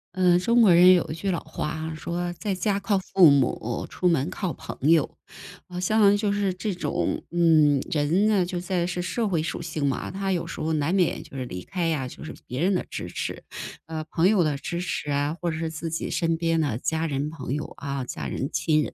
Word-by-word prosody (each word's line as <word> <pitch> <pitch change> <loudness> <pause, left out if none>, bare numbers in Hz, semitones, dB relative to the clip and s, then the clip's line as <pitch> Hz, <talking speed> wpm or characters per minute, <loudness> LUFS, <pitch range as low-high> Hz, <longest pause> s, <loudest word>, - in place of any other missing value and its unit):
嗯， 180 -1 +4
中 235 +6 +3
国 195 -6 +7
人 180 +2 +8
有 180 - +3
一 - - -3
句 180 +5 -2
老 175 - -1
话 155 -1 -5
啊， 160 +1 -4
说： 175 +2 -3
“在 205 -2 -2
家 200 +2 0
靠 200 0 +1
父 185 -3 +5
母， 125 -4 +1
出 180 - +1
门 160 -2 +1
靠 185 -1 -3
朋 140 +1 -3
友”， 165 -2 +3 0.5
好 180 0 -5
像 205 +2 +4
就 205 -1 0
是 200 -2 0
这 195 +3 -3
种 180 - -2
嗯， 160 -4 +4
人 165 +7 +2
呢， 200 -5 +3
就 180 0 -3
在 175 -1 -1
是 180 0 -2
社 185 +7 -1
会 170 -4 +1
属 170 - -4
性 160 -3 -3
嘛， 135 - -2
他 195 0 -1
有 175 - -1
时 - - -7
候 160 +1 -1
难 155 +3 0
免 185 -3 +1
就 135 - -11
是 130 - -3
离 90 -6 -7
开 180 -3 -2
呀， 145 -6 -1
就 - - -10
是 - - -7
别 125 +1 -5
人 190 +3 +3
的 - - 0
支 - - -5
持， - - -4 0.4
啊， 160 0 -5
朋 165 +2 +1
友 200 -4 +4
的 150 -2 0
支 170 +4 -4
持 175 -4 -3
啊， 145 +3 0
或 175 - 0
者 160 - -2
是 160 0 -2
自 160 +1 -5
己 165 - -3
身 165 -1 +1
边 165 0 0
呢， 140 -8 0
家 160 +5 -1
人 145 0 -2
朋 145 -5 -5
友， 150 +1 -4
啊， 140 -2 -3
家 125 - -5
人、 135 - -3
亲 155 -2 +2
人， - - -6
165 Hz, 255 characters per minute, -25 LUFS, 150-185 Hz, 0.5 s, 人